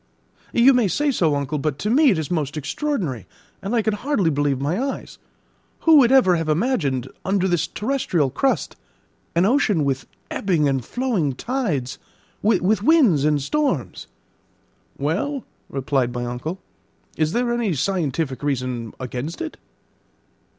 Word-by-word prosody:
"You 245 Hz, +3 st, +6 dB
may 245 Hz, -4 st, +3 dB
say 290 Hz, +9 st, +1 dB
so, 160 Hz, -, +2 dB
uncle; 145 Hz, +1 st, -2 dB
but 145 Hz, -1 st, -2 dB
to 210 Hz, -, -2 dB
me 290 Hz, +3 st, +5 dB
it 195 Hz, -, +2 dB
is 160 Hz, +1 st, -3 dB
most 155 Hz, -3 st, -1 dB
extraordinary, 155 Hz, -, -3 dB, 0.3 s
and 200 Hz, +5 st, -2 dB
I 225 Hz, -, +2 dB
can 220 Hz, -, +1 dB
hardly 210 Hz, -, 0 dB
believe 145 Hz, -2 st, 0 dB
my 155 Hz, -, -1 dB
eyes. 275 Hz, 0 st, -5 dB, 0.6 s
Who 325 Hz, -2 st, +6 dB
would 255 Hz, -3 st, +6 dB
ever 215 Hz, -10 st, +5 dB
have 165 Hz, -1 st, -2 dB
imagined, 150 Hz, -, 0 dB, 0.2 s
under 190 Hz, -1 st, +1 dB
this 170 Hz, -3 st, +1 dB
terrestrial 210 Hz, -, -1 dB
crust, 265 Hz, -, 0 dB, 0.6 s
an 170 Hz, +2 st, +4 dB
ocean 210 Hz, -, +2 dB
with 135 Hz, -1 st, -2 dB, 0.2 s
ebbing 170 Hz, -7 st, +1 dB
and 135 Hz, -2 st, 0 dB
flowing 215 Hz, -, -1 dB
tides, 170 Hz, -, -2 dB, 0.4 s
with 210 Hz, -1 st, +2 dB
winds 225 Hz, -, +4 dB
and 150 Hz, -1 st, +3 dB
storms?" 185 Hz, -, -1 dB, 0.9 s
"Well," 195 Hz, -, -1 dB, 0.3 s
replied 135 Hz, -2 st, 0 dB
my 120 Hz, 0 st, -2 dB
uncle, 125 Hz, +10 st, -4 dB, 0.6 s
"is 155 Hz, +1 st, 0 dB
there 240 Hz, 0 st, +1 dB
any 230 Hz, -8 st, 0 dB
scientific 150 Hz, -5 st, -1 dB
reason 125 Hz, -5 st, -3 dB
against 130 Hz, +5 st, -5 dB
it?" 325 Hz, -2 st, -5 dB
170 Hz, 145 wpm, -22 LUFS, -, 0.9 s, You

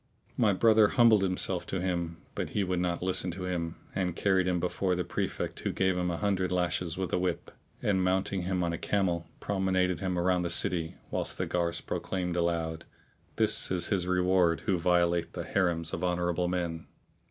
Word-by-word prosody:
My 110 Hz, -4 st, +3 dB
brother 110 Hz, +2 st, +5 dB
humbled 115 Hz, -2 st, +5 dB
himself 90 Hz, -1 st, -1 dB
to 95 Hz, -, -2 dB
him; 85 Hz, -2 st, -2 dB, 0.2 s
but -, -, -3 dB
he 100 Hz, -, +3 dB
would 90 Hz, -1 st, -1 dB
not 90 Hz, 0 st, -1 dB
listen 95 Hz, 0 st, +3 dB
to 95 Hz, +1 st, -6 dB
him 85 Hz, -2 st, -3 dB, 0.2 s
and 90 Hz, -3 st, -1 dB
carried 95 Hz, -1 st, +2 dB
him 90 Hz, -1 st, +1 dB
before 90 Hz, +1 st, 0 dB
the 90 Hz, -, -1 dB
Prefect -, -, -3 dB
who -, -, -2 dB
gave 95 Hz, -1 st, +1 dB
him 90 Hz, 0 st, -1 dB
an 85 Hz, -, -2 dB
hundred 95 Hz, -2 st, 0 dB
lashes 90 Hz, -1 st, -1 dB
with 95 Hz, -1 st, -3 dB
a -, -, +2 dB
whip 90 Hz, -2 st, -2 dB, 0.3 s
and, 95 Hz, -2 st, +2 dB
mounting 95 Hz, +1 st, 0 dB
him 90 Hz, 0 st, -1 dB
on 85 Hz, -1 st, -1 dB
a 85 Hz, -, -4 dB
camel, 90 Hz, -4 st, 0 dB
promenaded 95 Hz, -3 st, 0 dB
him 90 Hz, -1 st, -2 dB
round 90 Hz, +1 st, +2 dB
about -, -, -1 dB
the 85 Hz, -, -2 dB
city, 85 Hz, -1 st, +1 dB, 0.2 s
whilst -, -, -2 dB
the -, -, -1 dB
guards 85 Hz, -1 st, -1 dB
proclaimed 90 Hz, -2 st, -3 dB
aloud, 85 Hz, -2 st, -1 dB, 0.5 s
"This -, -, +4 dB
is 90 Hz, -2 st, +1 dB
his 95 Hz, -4 st, 0 dB
reward 90 Hz, -2 st, +2 dB
who 95 Hz, -5 st, 0 dB
violateth 85 Hz, -1 st, +1 dB
the -, -, -4 dB
Harims 85 Hz, -4 st, 0 dB
of -, -, -3 dB
honourable 90 Hz, 0 st, 0 dB
men!" 85 Hz, -2 st, -3 dB
90 Hz, 195 wpm, -29 LUFS, 85-95 Hz, 0.5 s, brother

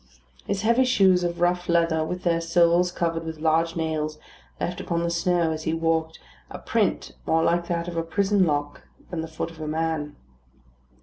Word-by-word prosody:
His 195 Hz, 0 st, -2 dB
heavy 235 Hz, +3 st, +4 dB
shoes 190 Hz, -7 st, +4 dB
of 175 Hz, 0 st, -2 dB
rough 175 Hz, 0 st, +1 dB
leather, 165 Hz, -2 st, +2 dB
with 180 Hz, +3 st, -4 dB
their 170 Hz, -1 st, +1 dB
soles 170 Hz, +1 st, +3 dB
covered 165 Hz, -2 st, -2 dB
with 160 Hz, -1 st, -6 dB
large 165 Hz, +1 st, +1 dB
nails, 155 Hz, -2 st, -2 dB, 0.4 s
left 175 Hz, 0 st, -3 dB
upon 170 Hz, -1 st, -1 dB
the 170 Hz, -, -1 dB
snow, 170 Hz, -1 st, +1 dB
as 155 Hz, 0 st, -3 dB
he 160 Hz, -, 0 dB
walked, 165 Hz, 0 st, 0 dB, 0.3 s
a -, -, -7 dB
print -, -, -1 dB, 0.2 s
more 160 Hz, 0 st, +3 dB
like 170 Hz, 0 st, +1 dB
that 170 Hz, 0 st, -2 dB
of 175 Hz, -, -5 dB
a -, -, +2 dB
prison 195 Hz, +4 st, +1 dB
lock 145 Hz, -1 st, -2 dB, 0.2 s
than 170 Hz, -2 st, -2 dB
the 160 Hz, -, -5 dB
foot 160 Hz, +1 st, -5 dB
of 160 Hz, -1 st, -12 dB
a 155 Hz, -, -4 dB
man. 155 Hz, -2 st, -2 dB
165 Hz, 190 wpm, -25 LUFS, 160-175 Hz, 0.4 s, heavy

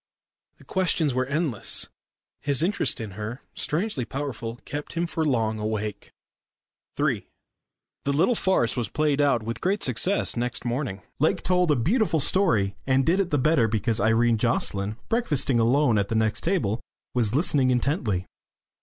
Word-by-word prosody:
The -, -, -18 dB
questions 175 Hz, -6 st, +1 dB
were 130 Hz, 0 st, 0 dB
endless. 140 Hz, -, +1 dB, 0.5 s
His 140 Hz, +1 st, +2 dB
interest 195 Hz, -4 st, +1 dB
in 110 Hz, -3 st, -5 dB
her, 105 Hz, +6 st, -6 dB
strangely 160 Hz, -, -1 dB
powerful, 120 Hz, -3 st, -5 dB
kept 145 Hz, +2 st, -6 dB
him 170 Hz, +1 st, -1 dB
for 165 Hz, -1 st, -2 dB
long 115 Hz, -7 st, 0 dB
awake. 105 Hz, -1 st, -3 dB, 0.9 s
III -, -, 0 dB, 0.8 s
The 140 Hz, -, +1 dB
little 165 Hz, -, +3 dB
farce 190 Hz, -, +1 dB
was 120 Hz, -5 st, -2 dB
played 150 Hz, 0 st, +1 dB
out 135 Hz, -6 st, +2 dB
with 115 Hz, +1 st, -5 dB
great 195 Hz, +3 st, 0 dB
success 135 Hz, -, +1 dB
next 120 Hz, +1 st, -2 dB
morning. 120 Hz, -5 st, -3 dB, 0.2 s
Lake 155 Hz, -, +1 dB
told 180 Hz, -1 st, +2 dB
a 150 Hz, -, +4 dB
beautiful 175 Hz, -, +1 dB
story, 115 Hz, -, +2 dB
and 130 Hz, 0 st, +3 dB
did 180 Hz, +4 st, +2 dB
it 190 Hz, -3 st, 0 dB
the 145 Hz, -, +1 dB
better 140 Hz, -3 st, +3 dB
because 110 Hz, +1 st, 0 dB
Irene 115 Hz, +1 st, +3 dB
Jocelyn, 105 Hz, -3 st, 0 dB
breakfasting 145 Hz, -, +1 dB
alone 120 Hz, -1 st, +3 dB
at 100 Hz, -, 0 dB
the 115 Hz, -, -1 dB
next 110 Hz, -1 st, +1 dB
table, 125 Hz, -, 0 dB, 0.3 s
was 120 Hz, -2 st, +1 dB
listening 145 Hz, -4 st, +3 dB
intently. 125 Hz, -, 0 dB
130 Hz, 155 wpm, -25 LUFS, 115-160 Hz, 0.9 s, a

